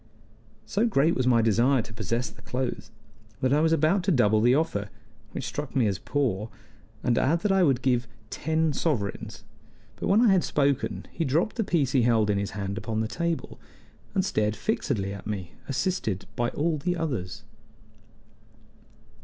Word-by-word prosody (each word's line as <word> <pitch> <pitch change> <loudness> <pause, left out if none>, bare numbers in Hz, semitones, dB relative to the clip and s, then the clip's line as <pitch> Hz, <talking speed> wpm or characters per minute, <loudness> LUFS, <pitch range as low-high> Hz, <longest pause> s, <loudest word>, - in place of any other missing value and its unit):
So 220 +4 +1
great 165 -5 +3
was 130 -1 0
my 115 -2 +4
desire 115 +3 +3
to 110 - -12
possess 115 +4 -2
the - - -17
clothes 125 0 -3 0.5
that 130 +1 +2
I 150 - +4
was 160 0 +3
about 165 +5 +3
to 190 - +3
double 110 - +4
the 120 +3 +5
offer, 120 -10 -1 0.4
which - - -5
struck 145 -2 -5
me 130 -4 +3
as 100 -3 0
poor, 115 -7 -1 0.5
and 120 -2 +2
add 165 +5 +2
that 210 - +1
I 195 0 +4
would 135 -7 +2
give 125 -2 +1 0.2
ten 160 -1 0
sovereigns; 110 -8 -2 0.5
but - - -3
when 205 - +4
I 235 -4 +5
had 185 -4 +4
spoken 140 -2 0
he 165 - -2
dropped 160 +9 +1
the 225 - 0
piece 155 -9 +1
he 130 - +3
held 115 -3 +3
in 100 - +1
his 100 - -3
hand 100 +1 -3
upon 110 -1 -2
the 110 - -1
table, 170 +6 -3 0.6
and 190 -1 +2
stared 105 - 0
fixedly 110 - -1
at 100 - -8
me, 95 -5 -4 0.2
assisted 135 - -1
by 120 0 0
all 155 0 -1
the 175 +4 -1
others. 125 - -3
130 Hz, 180 wpm, -27 LUFS, 110-160 Hz, 0.6 s, the